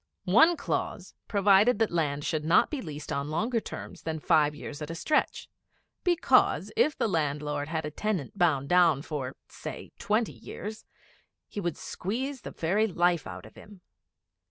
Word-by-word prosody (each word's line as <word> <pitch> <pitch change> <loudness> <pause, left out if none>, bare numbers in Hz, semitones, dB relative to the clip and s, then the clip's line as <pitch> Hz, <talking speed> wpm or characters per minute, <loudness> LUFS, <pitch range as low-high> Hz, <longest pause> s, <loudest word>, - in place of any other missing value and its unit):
One 320 - +5
clause - - -3
provided 200 +3 +4
that 225 0 +1
land 145 -4 -1
should 155 -2 -1
not 165 +3 +4
be 295 -4 -3
leased 150 -3 -7
on 140 +1 -2
longer 225 +10 0
terms - - -8
than 160 -1 -3
five 150 -2 +3
years 145 0 -8
at 150 - -5
a 165 - -4
stretch; 300 - 0 0.6
because, 350 -2 +3
if 310 -9 +2
the - - +1
landlord 150 -4 -1
had 160 -1 -2
a 150 - -4
tenant 190 -4 -2
bound 160 -8 +2
down 170 -4 +4
for, 135 -5 -4
say, - - -8
twenty 215 +2 0
years, 215 +1 -8 0.6
he - - -6
would 175 -4 -2
squeeze 260 +8 -4
the - - -7
very 200 +7 +1
life 175 - +1
out 95 0 -8
of 110 - -14
him. 205 -3 -14
170 Hz, 165 wpm, -28 LUFS, 150-215 Hz, 0.6 s, One